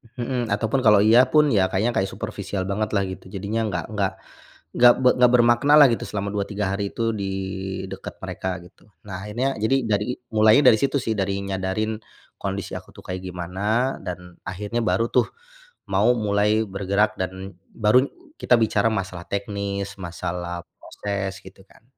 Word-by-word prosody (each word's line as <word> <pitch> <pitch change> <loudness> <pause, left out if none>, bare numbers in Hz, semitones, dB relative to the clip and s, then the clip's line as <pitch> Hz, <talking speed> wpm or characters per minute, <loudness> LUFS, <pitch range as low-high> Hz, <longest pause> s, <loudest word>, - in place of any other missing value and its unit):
Mhm. 120 -2 -2
Ataupun 110 +5 0
kalau 105 -3 +6
iya 115 +5 +6
pun, 150 -1 +5
ya 95 -6 +2
kayaknya 110 +5 0
kayak 95 0 +1
superfisial 100 -3 -4
bangetlah 100 -1 -1
gitu, 95 0 -9
jadinya 105 +3 -2
nggak 90 -3 -3
nggak 100 -2 0 0.6
nggak 120 0 +7
be 130 -1 +5
nggak 125 -1 +5
bermakna 120 +4 +4
lah 145 - +9
gitu 115 - -1
selama 100 -1 -3
2, 100 -1 0
3 105 0 -2
hari 100 0 -2
tuh 115 -1 -1
di 100 -1 -3 0.6
dekat 95 0 -8
mereka 95 -1 -4
gitu. 95 - -21 0.2
Nah 95 0 -6
akhirnya, 125 +6 -1
jadi 110 +5 +1
dari 105 -1 +1 0.3
mulainya 110 +5 +6
dari 110 - +5
situ 140 +1 +1
sih, 115 -3 -1
dari 100 0 -1
nyadarin 100 +3 -2 0.4
kondisi 100 0 -4
aku - - -9
tuh - - -14
kayak 90 0 -5
gimana, 95 +8 -1
dan 90 -1 -7
akhirnya 105 +5 -3
baru 115 +1 +1
tuh - - +2 0.6
mau - - +3
mulai 105 0 +2
bergerak 100 +2 0
dan 95 0 -5 0.2
baru 115 +4 +4 0.3
kita 125 - +3
bicara 110 -1 +2
masalah 95 -4 -3
teknis, 100 0 -3
masalah 85 0 -5 0.2
proses, 100 -2 -4
gitu 95 0 -14
kan. - - -23
100 Hz, 165 wpm, -23 LUFS, 95-115 Hz, 0.6 s, lah